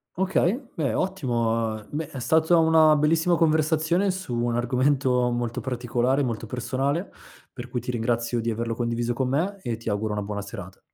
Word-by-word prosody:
Okay, 190 +4 +1 0.2
beh, 155 -4 -1
ottimo. 115 - -1
Beh, 150 +1 -3
è 140 - -7
stata 160 +6 +3
una 160 -1 +5
bellissima 160 +3 +2
conversazione 160 +3 +2
su 185 -9 -3
un 120 0 0
argomento 125 +1 +2
molto 120 -1 -2
particolare, 125 +2 0
molto 115 -3 -3
personale, 135 - -2 0.4
per 125 -1 -8
cui 125 - -2
ti 125 - -3
ringrazio 120 0 -1
di 115 - -1
averlo 115 +1 -2
condiviso 120 0 -1
con 125 +1 -1
me 180 +9 -1
e 120 -6 -3
ti 115 - -5
auguro 105 +1 -1
una 105 0 -2
buona 100 0 -4
serata. 100 -2 -9
125 Hz, 170 wpm, -25 LUFS, 115-160 Hz, 0.4 s, una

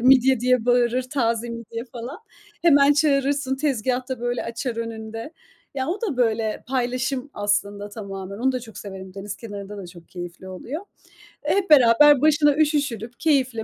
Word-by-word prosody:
midye 260 0 +5
diye 250 -2 +2
bağırır, 245 +1 +3
taze 240 -3 -1
midye 230 0 -6
falan. 250 - -7 0.4
Hemen 285 -4 +6
çağırırsın, 280 -2 +1
tezgâhta 255 -2 -1
böyle, 245 0 -2
açar 230 +1 -4
önünde. 225 +3 -6 0.4
Ya 260 -1 -2
o 355 +7 -2
da 410 - -2
böyle 225 -3 0
paylaşım 255 +1 -1
aslında 205 0 -1
tamamen. 200 -2 -7
Onu 260 +3 +1
da 255 - -2
çok 220 -4 -11
severim. 190 -2 -9
Deniz 200 0 -6
kenarında 205 -2 -8
da 195 -3 -7
çok 170 -1 -14
keyifli 175 +1 -8
oluyor. 245 - -6 0.6
E, 295 - +1
hep 390 -2 0
beraber 285 0 +7
başına 295 -1 +4
üşüşülüp 280 -7 0
keyifle, 260 -8 +1
245 Hz, 155 wpm, -23 LUFS, 220-275 Hz, 0.6 s, beraber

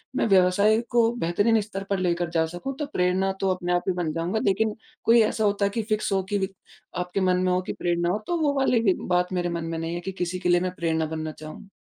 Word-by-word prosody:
मैं - - +1
व्यवसाय 200 +2 +4
को 235 -1 +3
बेहतरीन 205 +4 +2
स्तर 200 -1 -6
पर 195 -2 0
लेकर 175 -1 0
जा 165 -1 +1
सकूँ, 175 +12 -5
तो 295 - -1
प्रेरणा 190 -6 0
तो 195 - +1
अपने 180 -1 -2
आप 175 - +1
ही 185 - +2
बन 155 - -1
जाऊँगा। 170 +6 -1
लेकिन 210 +2 +1 0.3
कोई 230 0 +6
ऐसा 220 0 +1
होता 200 -1 +2
कि - - +2
फ़िक्स 215 -1 0
हो 190 -1 +1
कि 195 -2 +1 0.5
आपके 180 +2 -2
मन 180 -1 +3
में 185 - +2
हो 180 0 +1
कि - - -2
प्रेरणा 175 0 0
हो, 205 - 0
तो 345 - 0
वो 290 -2 +2
वाले 255 -3 +3
भी 200 -5 +3
बात 180 0 +1
मेरे 175 -1 0
मन 170 -1 -3
में 165 0 -3
नहीं 165 +1 -3
है 175 - -4
कि 190 +2 -5
किसी 180 -1 -3
के 180 -1 -1
लिए 175 0 +5
मैं 185 0 -1
प्रेरणा 160 -2 0
बनना 155 0 -4
चाहूँ। 155 +5 -11
185 Hz, 255 wpm, -25 LUFS, 175-205 Hz, 0.5 s, कोई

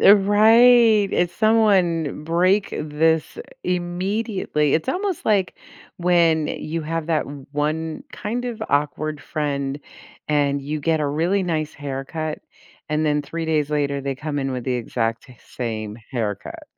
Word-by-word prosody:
Eh, 200 - +8
right. 220 +1 +6
If 175 0 +1
someone 185 -9 +2
break 185 +5 +2
this 155 - 0 0.2
immediately, 180 - -1
it's 160 - 0
almost 380 -2 -2
like 200 -4 +2 0.4
when 170 -3 +3
you 165 +1 -4
have 165 +1 -3
that 160 -2 +1 0.3
1 155 +2 -2
kind 240 +4 -4
of 235 -3 -4
awkward 150 +1 -1
friend 140 -2 -2 0.5
and 145 -2 +1
you 150 +2 -4
get 160 +1 +1
a 150 - +1
really 170 +7 +1
nice 155 -4 -2
haircut, 145 +3 -4 0.5
and 155 0 0
then 150 0 +1
3 165 +3 -5
days 155 -2 0
later, 140 -2 0
they 135 0 -3
come 150 +2 -4
in 135 -1 -1
with 125 -2 -4
the 130 - -1
exact 115 0 -2
same 110 -3 -5
haircut. 110 -6 -4
155 Hz, 140 wpm, -22 LUFS, 145-185 Hz, 0.5 s, Eh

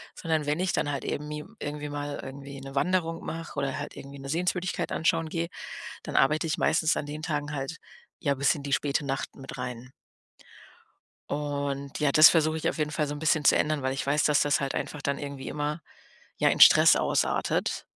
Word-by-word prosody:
Sondern 160 -3 -1
wenn 150 +3 0
ich 185 -1 0
dann 145 - 0
halt 140 -3 -4
eben 150 +1 -3
mi 150 0 -5 0.2
irgendwie 150 0 -5
mal 145 0 -4
irgendwie 140 0 -9
'ne 135 0 -9
Wanderung 165 +2 0
mache 165 -1 -6
oder 140 -1 -1
halt - - -6
irgendwie 140 +1 -10
'ne 135 0 -8
Sehenswürdigkeit 180 +2 -1
anschauen 165 0 +1
gehe, 165 +1 -2 0.6
dann - - -6
arbeite 155 +4 +3
ich 155 - -1
meistens 160 +1 +2
an 145 - -2
den 150 +1 -6
Tagen 150 -1 -3
halt, 135 +3 -4 0.4
ja, 140 -2 +1
bis 140 +4 +2
in 145 - -7
die 140 0 -2
späte 145 0 0
Nacht 135 0 -3
mit 135 0 -9
rein. 125 0 -6 1.4
Und 140 -1 -3
ja, 145 -2 +2
das 155 0 +10
versuche 160 -1 +2
ich 160 - -1
auf - - -3
jeden 150 -1 0
Fall 150 -1 -1
so 145 - -4
'n - - -7
bisschen 155 -1 +2
zu - - +6
ändern, 150 -2 +1
weil 130 0 0
ich 135 - -3
weiß, 145 +1 +2
dass 150 -2 +4
das 145 +1 +2
halt 140 -1 -2
einfach 150 -2 -4
dann 140 0 -1
irgendwie 140 -2 -6
immer, 150 +2 -3 0.6
ja, - - +4
in - - -1
Stress - - +9
ausartet. - - 0
145 Hz, 210 wpm, -27 LUFS, 140-155 Hz, 1.4 s, das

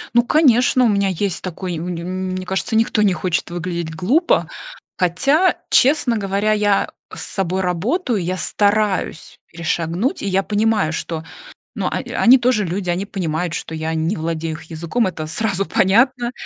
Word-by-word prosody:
Ну 240 - +6
конечно, 255 -2 +4
у - - +5
меня 200 -2 +2
есть 190 0 -2
такой, 185 0 -4
м 160 +1 -5 0.5
мне 185 0 -4
кажется, 190 +4 -1
никто 225 -1 +2
не 205 -2 +4
хочет 175 0 -2
выглядеть 170 -2 -4
глупо. 245 - +2 0.5
Хотя, 275 - +2
честно 265 -3 +3
говоря, 200 +1 0
я 205 -2 +2 0.2
с - - -6
собой 190 -1 -2
работаю, 205 - -1
я 185 +2 -2
стараюсь 205 -1 0
перешагнуть, 170 - -2
и - - -4
я 195 0 +2
понимаю, 210 -4 +1
что, 165 0 -4 0.5
ну, - - -2
о - - -1
они 255 +2 +4
тоже 240 -4 +1
люди, 180 +1 -2
они 180 +3 -2
понимают, 175 -3 -3
что 175 - -5
я 160 0 -3
не 160 +6 -1
владею 160 -1 -3
их 155 - -10
языком, 165 +8 -2
это 160 -4 -4
сразу 195 +2 -1
понятно. 240 +6 +2
190 Hz, 160 wpm, -19 LUFS, 170-225 Hz, 0.5 s, Ну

